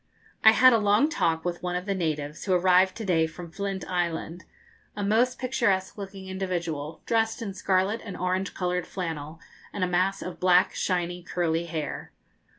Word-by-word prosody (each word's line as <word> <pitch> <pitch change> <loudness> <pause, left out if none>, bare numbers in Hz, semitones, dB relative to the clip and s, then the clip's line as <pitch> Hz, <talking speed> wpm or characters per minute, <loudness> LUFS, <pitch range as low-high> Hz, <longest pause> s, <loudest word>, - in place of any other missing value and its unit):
I 220 - +9
had 255 +2 +7
a 230 - +4
long 210 +8 +3
talk 165 - 0
with 175 -1 -2
one 180 0 -2
of 180 +1 -3
the 200 - 0
natives, 155 -4 -3
who 190 - +1
arrived 185 +1 +4
to 225 - -5
day 165 -4 +2
from 170 +1 -10
Flint 195 +1 -4
Island 175 -1 -2 0.5
a 205 - -3
most 230 +5 +2
picturesque 230 -7 0
looking 195 -2 -8
individual, 170 -5 -4
dressed 225 -1 +1
in 205 -4 -5
scarlet 190 +3 0
and 200 -5 -7
orange 185 +2 -1
coloured 180 -1 -1
flannel, 160 -3 -5 0.3
and 200 - -3
a - - +2
mass 185 +2 0
of 180 - -7
black, 180 0 +4
shiny, 175 -1 -1
curly 170 -1 -1
hair. 155 -3 -5
185 Hz, 175 wpm, -26 LUFS, 170-200 Hz, 0.5 s, I